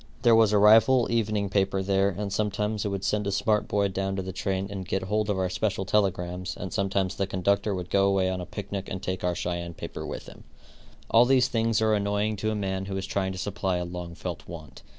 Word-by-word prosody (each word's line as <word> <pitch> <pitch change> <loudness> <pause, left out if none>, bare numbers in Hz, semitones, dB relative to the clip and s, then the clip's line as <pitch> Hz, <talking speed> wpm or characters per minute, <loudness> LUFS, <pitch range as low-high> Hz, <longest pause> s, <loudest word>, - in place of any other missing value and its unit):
There 120 -2 +6
was 110 -2 +5
a 105 - +4
rival 115 +5 +6
evening 105 -3 0
paper 95 0 +1
there, 95 +1 +2
and 100 0 -4
sometimes 105 0 -1
it - - -1
would 100 -1 -3
send 105 -1 0
a - - 0
smart 105 +2 +1
boy 100 0 +1
down 95 +1 -2
to 95 - -2
the 95 - -5
train 95 +1 -2
and 95 -2 -4
get 95 - -1
hold 105 +2 -1
of 100 - 0
our 95 -1 +1
special 95 +1 -1
telegrams, 90 -2 -1
and 95 - -6
sometimes 95 -1 0
the 95 - -2
conductor 100 +2 0
would 90 -1 -6
go 100 0 +4
away 95 -1 +2
on 95 -1 -2
a 90 - -7
picnic 100 -1 -5
and 95 - -5
take 95 0 -3
our 90 -1 0
Cheyenne 85 -1 -3
paper - - -7
with - - -6
him. - - -13 0.7
All 115 +1 +7
these 130 0 +3
things 115 -1 +1
are 110 0 +3
annoying 105 +1 0
to 110 +2 -1
a 110 - -1
man 95 -2 -2
who 95 -1 -3
is 95 - -3
trying 95 -1 -1
to - - -7
supply 95 -1 -2
a 90 - -2
long 85 -1 -7
felt 90 -1 -6
want. 80 -5 -10
100 Hz, 240 wpm, -27 LUFS, 95-105 Hz, 0.7 s, All